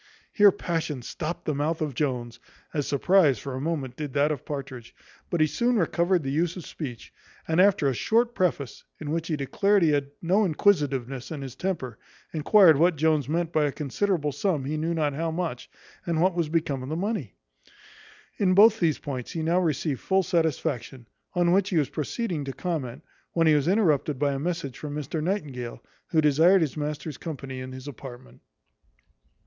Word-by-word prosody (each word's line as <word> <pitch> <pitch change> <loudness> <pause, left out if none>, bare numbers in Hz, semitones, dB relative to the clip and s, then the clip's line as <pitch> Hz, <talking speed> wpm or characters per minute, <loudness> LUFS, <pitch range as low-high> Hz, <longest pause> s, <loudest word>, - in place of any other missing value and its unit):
Here 205 -2 +7
passion 160 -8 -3
stopt 160 +7 -5
the 155 - 0
mouth 155 +4 -1
of 155 -4 -2
Jones, 120 -4 -2 0.3
as 145 -3 -1
surprize 150 -2 +3
for 135 +5 -6
a 130 - -4
moment 145 -5 -3
did 145 -2 -5
that 145 +1 +2
of 145 -5 -4
Partridge; 135 -5 -7 0.3
but 170 - 0
he - - +6
soon 240 +10 +1
recovered 175 -1 +1
the 135 - -2
use 165 +4 0
of 175 - -8
speech, 125 -8 -8 0.3
and 160 +2 +3
after 190 -7 +4
a 135 - +2
short 230 - +1
preface, 170 - -1 0.2
in 150 -1 -5
which 165 0 -2
he 160 - 0
declared 195 +8 +2
he 160 - +4
had 140 -1 0
no 190 +6 +2
inquisitiveness 140 - +1
in 150 -4 -5
his 130 -2 -8
temper, 140 -12 -3 0.3
enquired 165 +1 +6
what 170 +3 +4
Jones 155 -1 +1
meant 170 +1 -1
by 155 -1 +3
a 145 - 0
considerable 150 +2 -1
sum 145 -1 -1
he 150 +3 -2
knew 165 +2 -1
not 150 -3 0
how 165 +3 -2
much 160 -6 -4 0.4
and 165 -2 0
what 185 +2 +3
was 170 -3 -1
become 155 -5 -1
of 130 - -6
the 155 - -2
money. 205 +6 -3 1.0
In 185 -3 +3
both 220 +2 +7
these 160 -4 +2
points 130 -4 -5
he 160 - -3
now 170 +3 +2
received 150 -5 -1
full 190 0 +1
satisfaction; 155 - -1 0.3
on 175 -1 +3
which 195 +2 +3
he 180 - 0
was 145 -4 +2
proceeding 165 - -3
to 135 - -5
comment, 150 -6 -4 0.3
when 165 -1 +2
he 155 - +5
was 150 0 +2
interrupted 160 -8 +2
by 140 +1 +1
a 135 - -3
message 165 -4 -3
from 145 -1 -6
Mr 150 +1 -3
Nightingale, 150 - -3 0.3
who 160 - +2
desired 160 +6 +5
his 155 -4 -1
master's 150 -1 -4
company 135 -5 -6
in 130 0 -7
his 130 +2 -9
apartment. 120 - -10
155 Hz, 190 wpm, -26 LUFS, 140-175 Hz, 1.0 s, Here